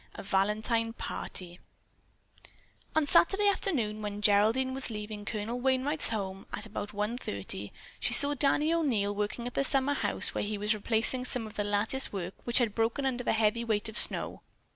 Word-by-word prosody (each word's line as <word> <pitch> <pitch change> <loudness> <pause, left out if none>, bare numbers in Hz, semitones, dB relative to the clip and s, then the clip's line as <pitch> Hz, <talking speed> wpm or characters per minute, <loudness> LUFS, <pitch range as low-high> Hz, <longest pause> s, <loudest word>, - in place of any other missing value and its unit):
A - - -8
VALENTINE 215 +4 0
PARTY 180 -6 -5 1.4
On 315 -1 +2
Saturday 390 +7 +4
afternoon, 245 - -1
when 205 -1 -5
Geraldine 220 +6 +3
was 265 -1 0
leaving 210 -1 -7
Colonel 225 +3 -4
Wainright's 265 +4 +1
home 195 -3 -5
at - - -3
about 210 -1 -6
one 210 +4 -3
thirty, 100 - -6 0.3
she 240 - +1
saw 285 +2 +9
Danny 295 +3 +1
O'Neil 235 -12 0
working 210 +3 -4
at 245 - -6
the - - 0
summer 275 +1 +4
house, - - -1
where - - -2
he 210 0 -3
was 210 +2 0
replacing 225 +4 +3
some 250 -2 +2
of 215 - -10
the 205 - -2
lattice 205 +6 -1
work 190 -2 -5
which 240 - +2
had 235 -5 +1
broken 230 +5 -1
under 250 -2 -2
the - - 0
heavy 220 +1 +1
weight 220 -2 -1
of 220 - -10
snow. - - 0
225 Hz, 180 wpm, -29 LUFS, 205-260 Hz, 1.4 s, saw